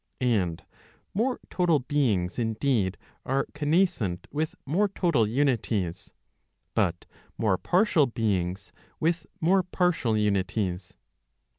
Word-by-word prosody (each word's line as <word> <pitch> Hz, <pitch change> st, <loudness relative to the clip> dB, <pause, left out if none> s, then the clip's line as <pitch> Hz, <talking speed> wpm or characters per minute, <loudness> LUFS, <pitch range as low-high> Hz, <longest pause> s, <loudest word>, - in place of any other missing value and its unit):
And 100 Hz, -10 st, 0 dB, 0.5 s
more 245 Hz, +6 st, 0 dB
total 175 Hz, -4 st, +3 dB
beings 125 Hz, -, 0 dB
indeed 110 Hz, -4 st, 0 dB, 0.3 s
are 135 Hz, +1 st, 0 dB
connas¬ 160 Hz, +6 st, +3 dB
cent 100 Hz, -, -5 dB
with 155 Hz, +2 st, -2 dB
more 180 Hz, +10 st, +2 dB
total 170 Hz, -, +1 dB
unities; 110 Hz, -8 st, 0 dB, 0.6 s
but 85 Hz, 0 st, 0 dB, 0.3 s
more 105 Hz, -5 st, +1 dB
partial 180 Hz, -6 st, +3 dB
beings 100 Hz, -5 st, -1 dB, 0.3 s
with 165 Hz, +1 st, 0 dB
more 185 Hz, +4 st, +4 dB
partial 180 Hz, -, +1 dB
unities. 100 Hz, -2 st, -1 dB
125 Hz, 105 wpm, -27 LUFS, 100-165 Hz, 0.6 s, more